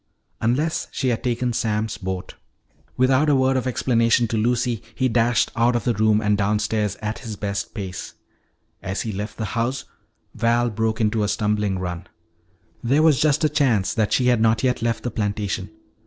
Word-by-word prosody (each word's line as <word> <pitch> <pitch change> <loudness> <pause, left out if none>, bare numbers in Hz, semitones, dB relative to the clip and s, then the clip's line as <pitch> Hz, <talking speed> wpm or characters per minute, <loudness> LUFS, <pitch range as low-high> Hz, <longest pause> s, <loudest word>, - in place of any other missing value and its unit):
Unless 140 +8 0
she 130 - -1
had 115 - -1
taken 125 0 0
Sam's 110 -1 -1
boat 95 -2 -5 0.6
Without 130 +4 +3
a 145 - +4
word 130 0 +2
of 130 0 0
explanation 115 -1 +2
to 115 - -1
Lucy, 120 0 0
he 130 - +1
dashed 120 0 +2
out 120 +1 +2
of 120 - 0
the 120 - +1
room 110 0 +2
and 105 -1 +2
downstairs 105 0 0
at 105 +1 -3
his 110 -2 -6
best 100 +1 -4
pace. 95 -4 -6 0.7
As 95 +1 -3
he 110 - -3
left 105 +2 -5
the 110 - -3
house 125 +2 -1 0.5
Val 120 +1 +1
broke 110 +1 -1
into 110 0 +1
a 105 - +1
stumbling 105 -1 0
run. 90 -1 -5 0.8
There 140 +6 +3
was 150 -6 +4
just 150 0 +2
a - - +5
chance 120 -10 +1
that 110 -2 0
she 125 - +2
had 120 -3 +3
not 110 +1 +2
yet 125 -2 +1
left 115 0 -1
the 120 - -2
plantation. 100 -2 -2
115 Hz, 185 wpm, -22 LUFS, 105-125 Hz, 0.8 s, a